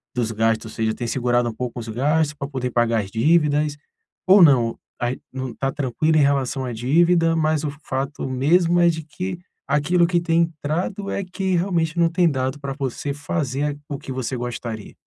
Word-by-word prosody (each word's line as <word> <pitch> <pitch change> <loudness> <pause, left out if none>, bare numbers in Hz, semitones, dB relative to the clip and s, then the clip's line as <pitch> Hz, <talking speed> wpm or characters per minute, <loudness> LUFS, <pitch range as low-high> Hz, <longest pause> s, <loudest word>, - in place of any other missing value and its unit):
dos 115 -2 -1
gastos, 110 0 0
ou - - -12
seja, 110 -1 0
tem 120 - -4
segurado 120 -1 0
pouco 125 +1 -5
os 115 - -7
gastos 150 +6 +1
pra 140 -2 -6
poder 130 -3 -3
pagar 115 -1 +2
as 95 - -10
dívidas, 150 +3 +2 0.5
ou 195 +1 +7
não, 120 -6 +4 0.2
aí 120 +1 -2
não 130 -1 -4
está 135 +2 -2
tranquilo 145 +4 0
em - - +5
relação 140 -1 +1
à 125 - -4
dívida, 165 +7 +3
mas 155 -1 +1
o - - -1
f 140 - -14
fato 135 +1 -3
mesmo 165 +7 +3
é 170 - +5
de 160 -1 -2
que 180 +4 -5 0.3
aquilo 170 +4 +2
que 175 0 +2
tem 170 -1 +2
entrado 170 +5 -3
é 200 - -2
que 185 0 -2
realmente 170 -2 0
não 170 - +4
tem 175 0 +3
dado 130 +1 -2
pra 140 -1 -4
você 140 +1 -3
fazer 145 -2 -2
aqu 145 0 -3
o 140 -2 -4
que - - -8
você 130 0 -3
gostaria? 120 -3 -6
145 Hz, 200 wpm, -22 LUFS, 125-165 Hz, 0.5 s, ou